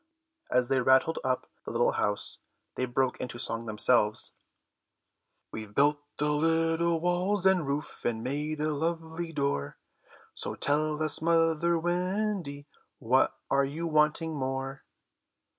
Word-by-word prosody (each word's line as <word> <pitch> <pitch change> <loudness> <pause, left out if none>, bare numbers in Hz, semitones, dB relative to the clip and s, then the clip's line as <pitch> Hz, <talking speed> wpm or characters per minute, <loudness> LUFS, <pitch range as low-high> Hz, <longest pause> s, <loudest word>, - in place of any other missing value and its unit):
As 125 -1 +2
they 135 0 +2
rattled 130 +5 +3
up 130 -1 0 0.2
the - - -7
little - - +2
house 105 0 -1 0.3
they 130 - -1
broke 130 +1 0
into 125 -1 -5
song 115 -1 -2
themselves: 110 0 +2 1.2
"We've 110 -2 -8
built 145 +1 +3 0.2
the 150 +1 +1
little 165 +2 +2
walls 180 +3 0
and 185 -6 +4
roof 140 +2 -4
And 115 -1 -1
made 150 +3 -3
a 155 0 0
lovely 165 +2 -3
door, 140 - -2 0.6
So - - -4
tell 155 +1 +1
us, 155 -1 +3
mother 165 0 +2
Wendy, 175 -3 -2 0.3
What 130 +2 +2
are 140 0 +4
you 150 +5 -3
wanting 155 +1 +2
more?" 135 0 -4
150 Hz, 130 wpm, -29 LUFS, 130-165 Hz, 1.2 s, and